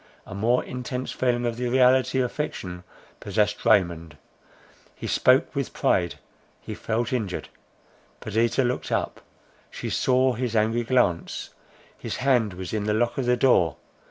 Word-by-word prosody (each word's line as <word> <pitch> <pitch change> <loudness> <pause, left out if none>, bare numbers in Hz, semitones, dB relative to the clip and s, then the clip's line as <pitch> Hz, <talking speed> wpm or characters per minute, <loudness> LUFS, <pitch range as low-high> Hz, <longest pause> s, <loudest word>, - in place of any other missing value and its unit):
A - - -9
more 115 +6 +1
intense 125 0 -5
feeling 120 -1 0
of 115 -1 -2
the 125 0 -2
reality 130 +1 +3
of 125 -1 -1
fiction 90 -12 -5 0.4
possessed 105 +1 -1
Raymond. 85 -4 +2 0.8
He - - -8
spoke - - +3
with - - -3
pride; 85 -2 +1 0.4
he - - -7
felt 115 +3 -2
injured. 105 -7 -3 0.7
Perdita 115 +4 +1
looked 125 0 -2
up; - - -2 0.5
she - - -6
saw 130 0 +2
his 120 -1 -3
angry 110 +2 +2
glance; 115 -10 0 0.4
his - - -5
hand 125 -6 +1
was 90 -1 -6
on 105 -1 -1
the 105 0 +1
lock 120 +4 0
of 125 - -1
the 125 0 +3
door. 95 - +3
120 Hz, 150 wpm, -25 LUFS, 100-125 Hz, 0.8 s, reality